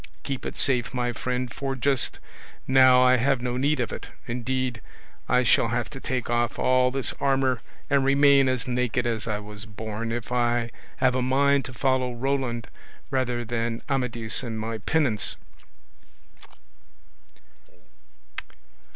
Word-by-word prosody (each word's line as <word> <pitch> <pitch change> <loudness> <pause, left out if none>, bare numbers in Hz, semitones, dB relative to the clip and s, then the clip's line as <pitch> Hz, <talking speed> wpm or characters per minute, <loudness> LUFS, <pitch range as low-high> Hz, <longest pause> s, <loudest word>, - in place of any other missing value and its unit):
Keep 135 -2 -4
it - - -7
safe, 125 -2 +1
my 120 -1 -1
friend, 125 0 -3
for 135 0 -3
just 135 0 +1 0.5
now 130 -1 +6
I 130 0 +5
have 135 +2 +2
no 125 0 -2
need 145 +3 +1
of 120 -4 -1
it; - - -7 0.2
indeed, 125 0 -2 0.5
I 125 0 +4
shall 115 - +4
have 120 +4 -2
to 135 - -8
take 130 -2 -3
off 120 0 0
all 130 0 +3
this 135 0 +2
armour 135 -3 +1 0.3
and 140 -1 +2
remain 140 0 +5
as 130 0 -2
naked 125 -1 0
as 115 -2 -2
I 105 -2 -1
was 105 0 -9
born, 110 +1 -5
if 120 0 -4
I 120 -1 +1 0.3
have 130 -1 +3
a 130 - 0
mind 140 +2 +2
to 130 - -7
follow 130 -1 0
Roland 125 -2 -2 0.4
rather 125 -2 -1
than 115 0 -2
Amadis 120 -5 -1
in 115 -4 -5
my 110 +1 -4
penance." 125 -3 0
125 Hz, 145 wpm, -25 LUFS, 120-130 Hz, 0.5 s, now